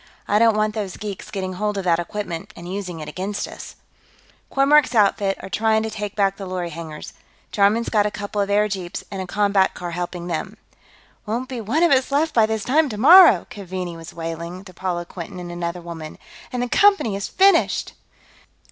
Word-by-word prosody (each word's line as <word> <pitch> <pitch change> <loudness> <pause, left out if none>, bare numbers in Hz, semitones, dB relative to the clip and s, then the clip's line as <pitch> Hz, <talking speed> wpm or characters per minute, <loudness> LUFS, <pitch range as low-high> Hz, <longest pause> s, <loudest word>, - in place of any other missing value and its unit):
I 210 - +3
don't 225 -1 +4
want 215 0 +1
these 205 -4 -4
geeks 205 -3 -7
getting 190 -2 -4
hold 210 +2 -2
of 195 - -2
that 170 -2 +2
equipment 190 +1 -5
and 170 - -10
using 180 -3 -5
it 150 - -7
against 200 +2 -4
us." - - -10 0.8
"Kormork's 275 -2 +4
outfit 200 -2 +2
are - - -6
trying 220 +2 +1
to 220 - -4
take 210 -2 -5
back 195 -2 +1
the 195 - -7
lorry 180 -2 -4
hangars. 160 -1 -8 0.4
Jarman's 210 +3 +2
got 210 -2 +2
a - - -1
couple 205 0 -4
of 200 - -1
airjeeps 200 -3 -1
and 195 -1 -4
a 185 - -6
combat 200 0 +2
car 175 -1 -5
helping 175 0 -4
them." 175 +5 -4 0.3
"... - - -31
won't 240 +5 -3
be 250 -3 -4
one 260 - +1
of 340 - +4
us 265 0 +3
left 305 +3 +1
by 220 -2 +4
this 220 -1 -2
time 300 +3 +2
tomorrow," 260 - +7
Keaveney 185 -3 -5
was 165 0 -10
wailing, 170 +2 -6
to 185 - -12
Paula 180 -2 -3
Quinton 175 +1 -8
and 175 -1 -7
another 175 0 -4
woman. 165 -2 -8 0.3
"And 250 -1 -2
the - - -2
Company 395 - +4
is 195 - -3
finished!" 390 +1 +3
200 Hz, 200 wpm, -22 LUFS, 180-220 Hz, 0.8 s, tomorrow